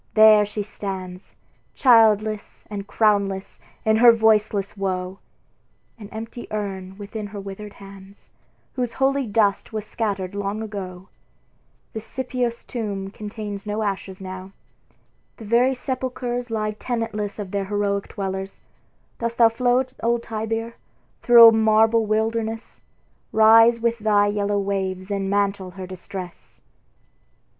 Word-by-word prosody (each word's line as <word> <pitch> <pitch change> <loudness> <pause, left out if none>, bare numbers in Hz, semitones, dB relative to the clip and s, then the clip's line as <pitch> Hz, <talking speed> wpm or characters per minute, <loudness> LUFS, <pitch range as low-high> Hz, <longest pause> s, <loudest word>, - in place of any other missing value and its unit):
there 215 -1 +8
she 210 0 -4
stands, 190 -3 -7 0.4
Childless 220 -4 +3
and 200 -1 -5
crownless 200 -3 0 0.3
in 220 0 +4
her 235 +1 +8
voiceless 215 -3 +2
woe; 190 -1 -3 0.8
An 205 -2 -10
empty 225 +2 -8
urn 195 -3 -5
within 210 +1 -6
her 205 0 -8
withered 200 +1 -8
hands, 195 0 -14 0.4
Whose 245 -2 -3
holy 270 -1 +1
dust 205 -2 +1
was 215 -1 -4
scattered 200 -4 -3
long 205 +2 -3
ago; 190 -3 -7 0.8
The 220 - -4
Scipios' 245 0 -3
tomb 200 -5 -4
contains 210 -1 -7
no 210 +1 -2
ashes 195 -2 -4
now: 185 0 -8 0.8
The 225 - -10
very 245 +5 +3
sepulchres 250 -2 -3
lie 215 -1 -1
tenantless 215 -2 -4
Of 200 -3 -6
their 200 -1 -1
heroic 200 0 -1
dwellers; 190 0 -5 0.6
dost 235 0 -3
thou 230 -1 +6
flow, 245 +2 +1 0.2
Old 235 0 +1
Tiber! 225 +1 -4 0.4
through 235 -1 +9
a - - +3
marble 220 0 +3
wilderness? 225 +1 -2 0.5
Rise 225 +2 +6
with 235 0 0
thy 210 -1 +3
yellow 205 0 0
waves, 190 -1 -3
and 195 -1 -1
mantle 200 -2 0
her 190 - -5
distress." 185 -1 -9
210 Hz, 125 wpm, -23 LUFS, 195-225 Hz, 0.8 s, through